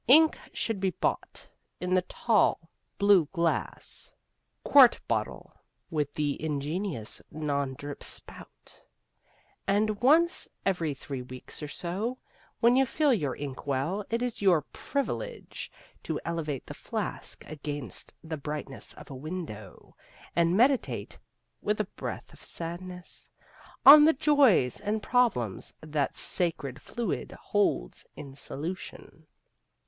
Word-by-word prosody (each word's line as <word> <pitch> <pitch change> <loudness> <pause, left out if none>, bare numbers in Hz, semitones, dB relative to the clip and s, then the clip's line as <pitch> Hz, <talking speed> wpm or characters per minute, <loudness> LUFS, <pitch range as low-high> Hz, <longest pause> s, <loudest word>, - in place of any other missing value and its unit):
Ink 310 +5 +7 0.2
should 225 -4 -2
be 190 0 +2
bought 180 - -2 0.3
in 180 0 -1
the 185 - +5
tall, 185 -4 +1 0.3
blue 200 -6 +5
glass, 170 -4 -1 0.5
quart - - +7
bottle - - -2 0.4
(with 150 -2 -1
the 150 0 -1
ingenious 150 - -3
non 140 -3 -2
drip 145 +1 -7
spout), - - -6 0.9
and 205 +1 +1
once 330 +7 +4 0.2
every 170 -7 0
three 130 0 -6
weeks 125 +4 -9
or 150 - -4
so, 195 - -3 0.4
when 240 +1 +6
you 265 - +6
fill 280 +2 +2
your 145 - 0
ink 140 0 -6
well, 145 +10 0
it 230 +2 0
is 245 -4 -3
your 180 -7 +4
privilege 455 - -4 0.3
to - - -3
elevate 155 -5 -3
the - - -7
flask - - -5
against 145 -4 -6
the 160 -1 -4
brightness 150 -1 -5
of - - -12
a - - -6
window, 130 - -7 0.4
and 170 +2 +3
meditate 260 +3 +2 0.4
(with 210 0 0
a - - +3
breath - - -7
of - - -16
sadness) 180 +2 -6 0.6
on 295 +2 +12
the 320 - +6
joys 275 - +4
and 210 +1 -2
problems 220 - +1
that 150 -3 -2
sacred 145 -6 0
fluid 240 -2 -3
holds 200 - -1
in 140 -2 -9
solution. 155 +6 -7
170 Hz, 125 wpm, -29 LUFS, 145-215 Hz, 0.9 s, on